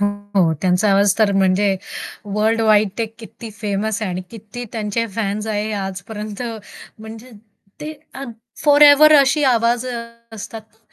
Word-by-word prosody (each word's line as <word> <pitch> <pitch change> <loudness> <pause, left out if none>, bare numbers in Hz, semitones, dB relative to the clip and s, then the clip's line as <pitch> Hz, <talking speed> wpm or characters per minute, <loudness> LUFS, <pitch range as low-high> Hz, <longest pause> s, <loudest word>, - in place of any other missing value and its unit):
हो, 205 - +3 0.3
हो. 165 -2 +3
त्यांचा 185 +3 +2
आवाज 200 0 +3
तर 210 -2 +3
म्हणजे 195 +1 +2 0.5
वर्ल्डवाईड 215 0 +2
ते 225 - 0
किती 225 0 -10
फेमस 210 +1 -2
आहे 190 - -2
आणि 180 +1 -4
किती 225 +2 -9
त्यांचे 225 +1 -2
फॅन्स 210 0 -2
आहेत 215 0 -2
आजपर्यंत 205 +3 -6 0.6
म्हणजे 220 +3 -11 0.5
ते 310 +1 -5 0.2
अ, 275 - -7 0.4
फॉरएव्हर 295 +1 +7
अशी 280 +2 +2
आवाज 240 0 +2
अ, 245 -2 -4 0.3
असतात 220 +1 -8
ना. 220 - -31
215 Hz, 145 wpm, -19 LUFS, 200-230 Hz, 0.6 s, फॉरएव्हर